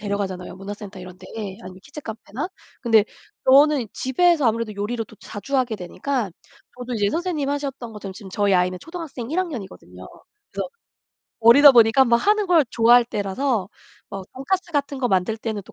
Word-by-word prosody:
데려가잖아요 195 -3 -4
문화센터 200 0 -8
이런 180 0 -11
데 - - -13 0.4
아니면 185 0 -10
키즈 290 +1 -10
카페나. 225 - -6 0.3
근데 225 -4 +4 0.4
저는 280 -1 +5
집에서 300 +2 +2
아무래도 225 -1 -1
요리를 220 +3 -3
또 220 - -17
자주 245 +9 -5
하게 245 -4 0
되니까 210 +4 -3 0.5
저도 245 0 -5
이제 205 -2 +1
선생님이 325 -5 -2
하셨던 275 -5 -4
것처럼 200 -2 -8
지금 195 -2 -11
저희 200 -1 +1
아이는 180 0 +1
초등학생 315 - -7
1 345 - -1
학년이거든요. 195 - -6 0.4
그래서 - - -4 0.7
어리다 280 +5 +9
보니까 235 +2 +6
막 235 -1 +4
하는 420 - +2
걸 330 -7 +4
좋아할 240 +1 +5
때라서 210 0 -1 0.4
막 195 -1 -6
돈가스 345 +7 -2
같은 280 -2 -1
거 250 - 0
만들 195 +3 0
때는 215 -3 -4
또 - - -16
235 Hz, 400 characters per minute, -22 LUFS, 200-280 Hz, 0.7 s, 어리다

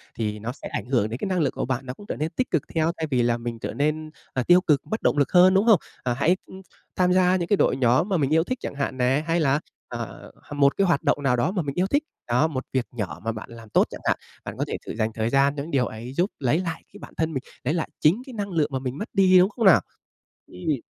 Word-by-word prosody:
thì 105 -2 -3
nó 115 +3 -4
sẽ 140 - -9
ảnh 100 - -4
hưởng 120 -5 +1
đến 115 - -4
cái - - -2
năng 185 -2 0
lượng 145 -4 +1
của - - -2
bạn, 130 +1 -2
nó 125 - -5
cũng 205 - -13
trở - - -3
nên 155 +2 -2
tích 255 +7 -2
cực 165 -5 +2
theo 160 +1 +2
thay 160 -1 -2
vì 125 -2 +3
là 120 0 +2
mình 115 -1 -5
trở - - -4
nên, 155 +2 -1 0.2
ờ, 130 - 0
tiêu 180 +1 +7
cực 150 -6 +2
mất - - -17
bất - - -7
động - - +2
lực 140 - +2
hơn, 185 +1 +7
đúng 195 +3 +3
không? 215 -8 +6 0.2
Ờ, 125 -1 0
hãy, 165 +8 +2
ưm, 190 0 -11 0.3
tham 180 0 +3
gia 185 0 +4
những 175 -2 -1
cái 205 - +3
đội 130 - +2
nhóm 130 - +3
mà 185 - +2
mình 140 -3 +1
yêu 160 0 +4
thích 255 +6 -3
chẳng - - -5
hạn 140 -2 -2
nè, 130 +4 +2
hay 165 +1 +2
là, 140 -1 +2 0.3
à, - - -5 0.6
một 140 -1 +3
cái 195 -1 +3
hoạt 165 -5 +1
động 145 - +1
nào 125 -2 +3
đó 145 +10 +1
mà 190 -3 -1
mình 140 -2 -4
yêu 185 +2 +1
thích, 285 +7 +1 0.2
đó, 125 +6 +3
một 135 -4 -4
việc 130 -2 +1
nhỏ 105 -6 -5
mà 115 - -1
bạn 110 +1 -8
làm 115 -2 -12
tốt - - +3
chẳng - - -9
hạn. - - +1 0.3
Bạn - - -6
có - - -1
thể - - -3 0.2
dành 110 -1 +1
thời 110 +1 0
gian 140 +2 +3
cho 140 - -3
những 165 - -8
điều 130 -3 +2
ấy 120 +4 -7
giúp 180 +7 0
lấy 145 +5 +2
lại 170 -3 -4
cái - - -11
bản - - -11
thân 160 -1 0
mình, 130 - -3 0.2
lấy 140 +5 0
lại 170 - -2
chính 175 +11 +3
cái 260 - -10
năng 205 -2 -4
lượng 160 -3 +1
mà 130 - 0
mình 130 +1 -4
mất 210 - -5
đi, 185 -2 +5
đúng 185 +3 +4
không 225 -1 -2
nào? 190 - +7 0.7
Ừm. 125 - -3
145 Hz, 300 wpm, -24 LUFS, 125-180 Hz, 0.7 s, tiêu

